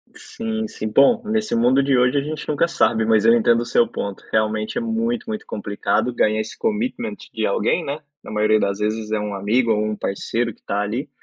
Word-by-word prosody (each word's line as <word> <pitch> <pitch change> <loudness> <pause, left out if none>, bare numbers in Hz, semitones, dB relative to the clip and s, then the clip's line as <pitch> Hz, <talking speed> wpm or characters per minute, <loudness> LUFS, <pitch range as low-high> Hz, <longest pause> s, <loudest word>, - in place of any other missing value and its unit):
Sim, 225 -1 -4
sim, 110 - -5
bom, 140 - +5
nesse 215 0 0
mundo 125 +4 +4
de 135 -1 +2
hoje 125 +3 +3
a - - +3
gente 150 +1 -5
nunca 150 +3 +1
sabe, 110 -9 +2
mas 110 -2 +3
eu 115 - +7
entendo 115 0 +3
o - - -3
seu 120 0 +3
ponto. 100 -1 -5
Realmente 110 - 0
é - - 0
muito, 230 +1 -1
muito 220 -1 -4
complicado 105 +4 -1
ganhar 110 -2 +2
esse 110 - -8
commitment 225 +3 -2 0.2
de - - -1
alguém, 480 -1 +1
né? 145 +2 -3 0.2
Na - - -10
maioria 110 0 +2
das 100 -1 -1
vezes 110 +1 -2
é 110 - +1
um 105 -1 -3
amigo 110 +5 +1
ou 105 -1 +2
um 110 0 -2
parceiro 115 +4 -2
que - - -27
está 100 - -2
ali, 120 +8 -3
120 Hz, 220 wpm, -21 LUFS, 110-170 Hz, 0.2 s, eu